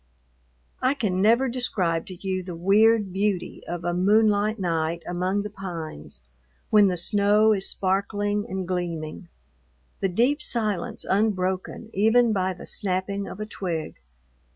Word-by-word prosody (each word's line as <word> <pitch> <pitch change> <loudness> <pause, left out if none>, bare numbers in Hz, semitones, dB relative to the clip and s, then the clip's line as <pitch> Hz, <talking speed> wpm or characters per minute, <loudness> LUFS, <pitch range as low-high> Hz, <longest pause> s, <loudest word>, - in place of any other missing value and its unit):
I 260 +3 +2
can 190 -8 -1
never 235 +6 +4
describe 190 -10 -1
to 185 - -7
you 185 -1 -1
the 180 -1 -7
weird 205 +3 +3
beauty 195 -2 -1
of 175 0 -4
a 175 0 -1
moonlight 210 +3 +3
night 165 -3 -1
among 185 +3 -1
the 210 - -5
pines 170 - -7 0.5
when 210 -2 +6
the 180 -2 0
snow 205 +4 +4
is 195 -2 0
sparkling 205 +2 -1
and 190 -1 -3
gleaming, 170 -2 -4 0.7
the 195 - 0
deep 250 - +2
silence 215 -9 -1
unbroken 190 +1 -1
even 225 +3 +4
by 190 -2 0
the 175 - -11
snapping 195 +1 -2
of - - -8
a 215 - -3
twig. 175 -6 -4
195 Hz, 140 wpm, -25 LUFS, 180-215 Hz, 0.7 s, when